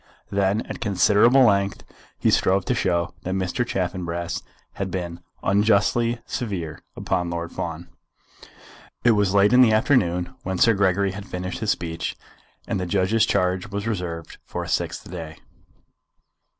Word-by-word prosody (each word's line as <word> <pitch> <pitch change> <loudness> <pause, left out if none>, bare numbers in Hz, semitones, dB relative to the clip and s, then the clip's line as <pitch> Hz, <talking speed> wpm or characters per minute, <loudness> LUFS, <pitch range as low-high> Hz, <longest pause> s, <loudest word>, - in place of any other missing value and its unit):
Then, 100 +2 +1
at - - -7
considerable 105 +5 +5
length, 100 -4 +2 0.3
he - - +2
strove 95 0 +2
to - - +1
show 85 -1 0
that 95 +1 -3
Mr. 95 +5 -1
Chaffanbrass 85 -5 -3 0.3
had 95 -1 -3
been 85 -2 -4 0.2
unjustly 110 +4 +2
severe 90 -10 -4
upon 90 -1 -1
Lord 85 0 -4
Fawn. 85 0 -5 1.2
It 120 - +6
was 100 -2 +2
late 100 +3 +5
in 125 - +7
the 115 -3 +6
afternoon 90 -7 +2
when 95 0 -3
Sir 115 +5 +5
Gregory 100 -1 +2
had 100 +2 -8
finished 90 +1 -5
his 110 - -2
speech, 80 -4 -2 0.5
and 100 - -1
the 90 - -3
judge's 100 +4 +2
charge 90 -1 +1
was 100 0 -4
reserved 90 -7 -4
for - - -5
a - - -7
sixth - - -2
day. 80 -3 -7
95 Hz, 150 wpm, -23 LUFS, 90-105 Hz, 1.2 s, in